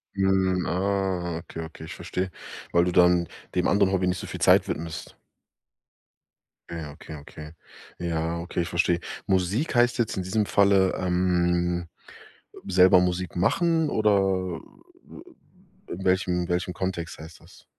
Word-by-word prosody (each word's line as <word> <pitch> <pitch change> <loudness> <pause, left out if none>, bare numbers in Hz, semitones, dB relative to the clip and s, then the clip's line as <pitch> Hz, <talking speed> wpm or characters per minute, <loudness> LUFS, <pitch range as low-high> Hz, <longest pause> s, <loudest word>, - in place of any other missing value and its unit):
Hm, 95 -2 +2
ah, 95 -2 -1
okay, 80 0 -8
okay, 80 0 -11
ich - - -8
verstehe. 90 0 -4 0.4
Weil 85 0 +4
du 90 - 0
dann 90 -1 +4 0.3
dem 90 - +2
anderen 100 -1 +3
Hobby 95 -1 +1
nicht 90 0 0
so - - -6
viel - - -7
Zeit - - +5
widmest. 80 0 -6 1.5
Ja, 80 -3 -6
okay, 80 +1 -10
okay. 75 +2 -11 0.5
Ja, 85 -1 -2
okay, 85 0 -3
ich 85 - -3
verstehe. 85 0 +1 0.3
Musik 95 - 0
heißt 120 +1 +3
jetzt 110 -4 0
in 95 - -1
diesem 105 +3 0
Falle, 100 -2 +3
ähm, 90 -1 +1 0.8
selber 90 -1 +6
Musik 90 0 -1
machen 160 - +2
oder, 110 -1 +2
äh, 95 -2 -1 1.3
w - - -11
in 95 - -7
welchem 90 -2 +1
welchem 90 +1 -1
Kontext 90 -4 -4
heißt 80 +1 -11
das? - - -18
90 Hz, 145 wpm, -25 LUFS, 85-95 Hz, 1.5 s, selber